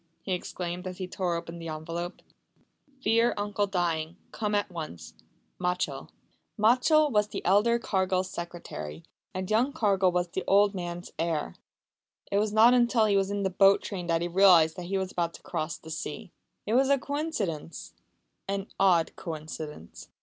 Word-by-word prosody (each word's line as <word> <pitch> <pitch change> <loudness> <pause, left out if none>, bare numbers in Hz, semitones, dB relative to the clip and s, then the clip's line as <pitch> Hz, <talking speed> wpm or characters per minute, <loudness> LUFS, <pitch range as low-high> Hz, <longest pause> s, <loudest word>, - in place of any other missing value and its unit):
he 195 - -5
exclaimed, 180 0 -4
as 180 -1 -6
he 185 - -4
tore 180 -1 -2
open 170 0 -6
the 165 - -7
envelope. 165 +3 -5 0.8
"Fear 230 +2 +3
uncle 205 0 -1
dying. 170 -3 -1
Come 210 -1 -1
at 205 -2 0
once. 155 - -7 0.5
Machell." 180 0 -2 0.5
Machell 255 +8 +4
was 210 -2 +2
the - - -6
elder 210 +6 +4
Cargill's 190 -4 0
secretary, 80 - -7 0.3
and 185 0 -3
young 240 +6 +3
Cargill 200 - +2
was 175 0 0
the - - -3
old 200 +1 +5
man's 175 -1 -5
heir. 160 - -1 0.8
It 200 - +3
was 210 0 0
not 225 +3 +6
until 240 -2 +4
he 205 -2 +2
was 195 0 +2
in 200 0 -2
the 190 - 0
boat 195 +2 +5
train 180 -4 -5
that 165 0 +1
he - - 0
realised 175 -3 +5
that 175 -1 -6
he 195 +1 -1
was 190 -1 -2
about 170 -1 -2
to - - -14
cross 155 +1 -3
the 160 - -11
sea. 170 +5 -6 0.3
It 215 - -1
was 265 +2 +4
a 280 - +5
coincidence 265 - -4 0.5
an 195 0 -3
odd 180 -4 +3
coincidence. 155 - -8
185 Hz, 170 wpm, -28 LUFS, 170-205 Hz, 0.8 s, not